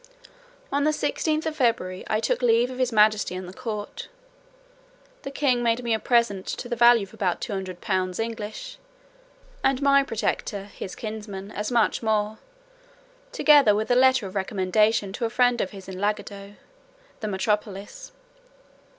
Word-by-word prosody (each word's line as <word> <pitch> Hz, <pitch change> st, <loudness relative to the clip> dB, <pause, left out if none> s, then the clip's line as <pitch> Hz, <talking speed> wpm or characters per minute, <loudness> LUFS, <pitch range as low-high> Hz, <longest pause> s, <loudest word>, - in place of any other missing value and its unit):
On 285 Hz, 0 st, +1 dB
the 305 Hz, -, +3 dB
16th 310 Hz, 0 st, -1 dB
day -, -, 0 dB
of 310 Hz, -, -9 dB
February 230 Hz, -8 st, 0 dB
I 215 Hz, -, +1 dB
took 225 Hz, -, 0 dB
leave 240 Hz, +1 st, +3 dB
of 255 Hz, -, -8 dB
his 255 Hz, -1 st, +1 dB
majesty 215 Hz, -3 st, +3 dB
and 185 Hz, 0 st, -6 dB
the 180 Hz, -, -9 dB
court. 215 Hz, -3 st, -6 dB, 1.1 s
The -, -, -6 dB
king 275 Hz, -3 st, +1 dB
made 235 Hz, +1 st, +1 dB
me 235 Hz, -1 st, 0 dB
a 220 Hz, -, +1 dB
present 235 Hz, -6 st, +1 dB
to -, -, -4 dB
the 240 Hz, -, -2 dB
value 235 Hz, -1 st, +6 dB
of 195 Hz, -, -11 dB
about 180 Hz, -3 st, -1 dB
two -, -, -4 dB
hundred 185 Hz, -2 st, -5 dB
pounds 185 Hz, -2 st, -1 dB
English, 225 Hz, -, -5 dB, 0.8 s
and 270 Hz, -1 st, +2 dB
my 280 Hz, 0 st, +5 dB
protector, 215 Hz, -5 st, -2 dB
his 200 Hz, -2 st, -8 dB
kinsman, 210 Hz, -2 st, -7 dB
as 210 Hz, +3 st, -4 dB
much 235 Hz, -3 st, +2 dB
more, 215 Hz, -1 st, 0 dB, 0.9 s
together 290 Hz, -, +5 dB
with 220 Hz, +3 st, -1 dB
a -, -, +5 dB
letter 260 Hz, -2 st, +4 dB
of 190 Hz, -, -7 dB
recommendation 200 Hz, +1 st, +1 dB
to 235 Hz, -, -2 dB
a -, -, -1 dB
friend 245 Hz, 0 st, +2 dB
of 190 Hz, -, -2 dB
his 195 Hz, -2 st, -11 dB
in 185 Hz, -1 st, -7 dB
Lagado, 205 Hz, 0 st, -3 dB, 0.6 s
the 215 Hz, -, -4 dB
metropolis. 205 Hz, -, -3 dB
220 Hz, 170 wpm, -25 LUFS, 200-245 Hz, 1.1 s, value